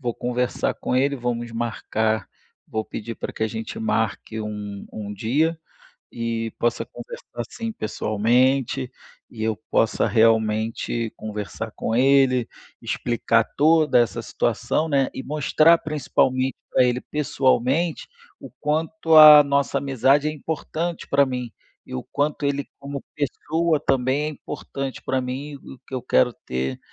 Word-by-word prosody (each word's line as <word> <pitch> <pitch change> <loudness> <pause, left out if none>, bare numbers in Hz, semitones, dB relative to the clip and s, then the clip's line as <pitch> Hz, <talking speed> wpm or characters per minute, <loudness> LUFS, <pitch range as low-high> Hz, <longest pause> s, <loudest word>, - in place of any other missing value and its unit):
vou 120 -3 -2
conversar 125 0 -1
com - - -3
ele, 140 +2 +2
vamos 120 -1 -3
marcar 110 -1 -1 0.4
vou 110 0 -3
pedir 115 +1 -6
pra - - -5
que - - -5
a - - +3
gente 110 - -6
marque 115 - -1
um 105 -2 -6
um 105 -1 -6
dia, 150 - 0 0.5
e 115 -1 -3
possa 120 0 0
conversar - - -8
sim 230 -1 -5
pessoalmente, 125 - +1 0.4
e 110 -2 -6
eu 110 -1 0
possa - - +2
realmente 110 +1 +1
conversar 110 +1 -6
com 110 - -2
ele, 130 -1 +4 0.3
explicar 115 -1 +1
toda 155 -3 +4
essa 115 -5 +1
situação, 160 +1 -1
né, 135 -2 +2
e - - -5
mostrar 155 +3 +4
principalmente 130 -4 0 0.2
pra - - +4
ele 125 0 +1
pessoalmente 140 +2 0 0.3
o - - -10
quanto 160 +1 +1
a 150 -1 +11
nossa 140 0 +1
amizade 135 +2 +2
é 155 - 0
importante 160 +2 -4
pra 140 0 +4
mim 125 -3 -4 0.3
e - - -7
o 65 - -4
quanto 145 0 -2
ele 140 -1 -1
como 140 0 -6
pessoa 155 +2 0
também 135 +2 +1
é - - -1
importante 135 -2 -6
pra 130 - 0
mim, 135 +4 -5
e - - -10
o 130 - -16
que - - -13
eu 130 - -3
quero 125 +1 +3
ter 65 +1 -3
130 Hz, 145 wpm, -23 LUFS, 115-145 Hz, 0.5 s, a